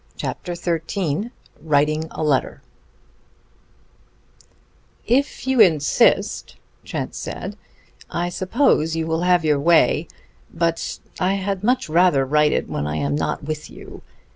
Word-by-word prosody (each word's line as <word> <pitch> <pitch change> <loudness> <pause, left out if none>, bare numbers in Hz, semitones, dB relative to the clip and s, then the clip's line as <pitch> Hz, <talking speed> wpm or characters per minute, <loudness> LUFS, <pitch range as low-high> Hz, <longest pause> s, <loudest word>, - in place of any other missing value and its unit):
CHAPTER 175 -1 -4
XIII 170 +3 -2 0.3
WRITING 155 +1 +1
A - - -5
LETTER 145 -4 0 2.4
"If 265 +3 0
you 265 -1 +1
insist," 160 -8 +3 0.3
Trent - - -4
said, - - -6 0.5
"I 175 +1 -2
suppose 185 - +1
you 165 0 -1
will 160 +1 -1
have 180 -2 +3
your 150 -2 +2
way. 165 +1 +3 0.4
But 165 0 -1 0.2
I 190 +1 +1
had 195 0 -3
much 245 -1 +1
rather 160 -4 +3
write 150 +2 +3
it - - -1
when 75 - -3
I 75 - -3
am 70 -1 -1
not - - -2
with 155 +1 -5
you. - - -12
165 Hz, 125 wpm, -21 LUFS, 150-185 Hz, 2.4 s, insist